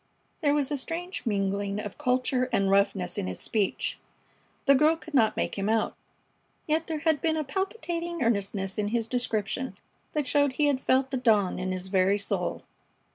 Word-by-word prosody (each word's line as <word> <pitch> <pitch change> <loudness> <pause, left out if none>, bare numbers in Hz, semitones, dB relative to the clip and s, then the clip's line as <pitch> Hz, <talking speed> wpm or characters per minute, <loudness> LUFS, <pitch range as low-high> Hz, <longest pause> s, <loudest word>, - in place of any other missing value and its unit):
There 290 -2 +3
was 285 -2 0
a 290 - +1
strange 340 +2 -4
mingling 200 -1 0
of 210 -2 -7
culture 255 0 +1
and 195 0 +2
roughness 195 -2 +1
in - - -2
his 90 -1 -4
speech. 210 -4 -1 0.7
The 280 - +7
girl 305 +4 +4
could 320 -1 -12
not 225 -6 +3
make - - -1
him 195 +2 0
out; 220 0 +1 0.7
yet 315 +1 0
there 315 -2 -3
had 315 -3 +2
been 320 -1 +1
a 310 - 0
palpitating 345 - -3
earnestness 200 -3 0
in 205 - 0
his 230 +1 0
description 245 0 -1 0.4
that 300 -2 0
showed 285 0 +2
he 295 +3 +2
had 280 -2 +2
felt 265 +1 +2
the 265 - 0
dawn 215 -8 +2
in 185 0 -2
his 185 0 -4
very 190 +1 +3
soul. 200 - -2
250 Hz, 185 wpm, -28 LUFS, 200-295 Hz, 0.7 s, The